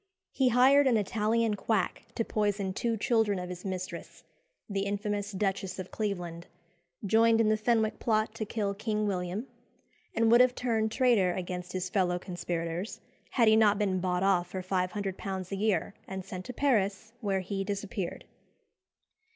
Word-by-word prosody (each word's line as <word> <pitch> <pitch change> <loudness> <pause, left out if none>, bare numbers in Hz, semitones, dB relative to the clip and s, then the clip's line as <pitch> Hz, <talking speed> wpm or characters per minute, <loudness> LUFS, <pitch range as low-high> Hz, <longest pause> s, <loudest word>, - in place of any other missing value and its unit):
He 260 -2 +2
hired 265 +4 +6
an 240 -3 +4
Italian 220 +2 +1
quack 205 -2 -1
to 230 - 0
poison 205 -2 0
two 230 +3 -1
children 220 -2 +2
of 180 0 -5
his 180 0 -7
mistress, 185 -1 -6 0.4
the 195 -1 -2
infamous 205 0 -2
Duchess 195 -1 -2
of 185 -1 -7
Cleveland, 180 -5 -4 0.6
joined 225 +2 +4
in 220 -1 +4
the 215 - +4
Fenwick 220 0 +1
plot 215 -1 +1
to 225 - -4
kill 205 -2 -1
King 215 +1 -1
William, 185 +3 -2 0.7
and 225 0 +3
would 240 +1 +8
have 250 0 +4
turned 220 -3 0
traitor 225 -8 +3
against 180 0 -5
his 185 -1 -2
fellow 180 -2 +1
conspirators 175 +1 -4 0.3
had 235 -4 +3
he 220 - +7
not 210 -2 +5
been 195 -3 +1
bought 180 0 0
off 185 -3 +3
for 185 +1 -5
£500 190 0 -2
a - - -1
year, 205 0 0
and 190 -1 -5
sent 185 -1 -7
to 250 - -6
Paris, 220 -5 0
where 195 -3 0
he 195 +1 -3
disappeared. 200 -2 -4
200 Hz, 160 wpm, -30 LUFS, 185-220 Hz, 0.7 s, would